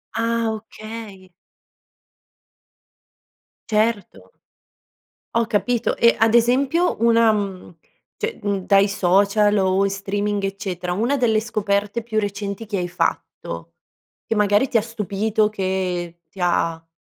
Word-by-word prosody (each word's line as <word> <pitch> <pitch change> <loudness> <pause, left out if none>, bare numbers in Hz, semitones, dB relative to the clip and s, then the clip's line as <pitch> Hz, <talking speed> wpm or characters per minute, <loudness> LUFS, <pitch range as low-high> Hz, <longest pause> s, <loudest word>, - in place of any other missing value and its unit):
Ah, 230 0 0
okay. 215 -3 -10 2.4
Certo. 210 - -1 1.0
Ho 230 0 +3
capito, 235 +2 0
e 235 - +5
ad 225 0 +4
esempio, 265 +9 +3
una 230 0 +4
mhmm, 195 -4 -4 0.4
cioè, 450 0 -3
mhmm, 200 -2 -1
dai 200 0 +4
social 200 +2 +3
o 190 +1 +2
in - - +1
streaming, 200 +1 -2
eccetera, 190 -2 -3
una 230 +10 +1
delle 235 -5 +2
scoperte 210 0 -1
più 220 -1 -1
recenti 200 +1 -4
che 205 -2 -3
hai 175 -1 -2
fatto, 85 - -3 0.5
che 225 - -2
magari 210 +4 +3
ti - - 0
ha 220 - +4
stupito, 215 -1 -1
che 185 -4 -3
ti - - -17
ha 165 -2 0
205 Hz, 120 wpm, -21 LUFS, 190-225 Hz, 2.4 s, e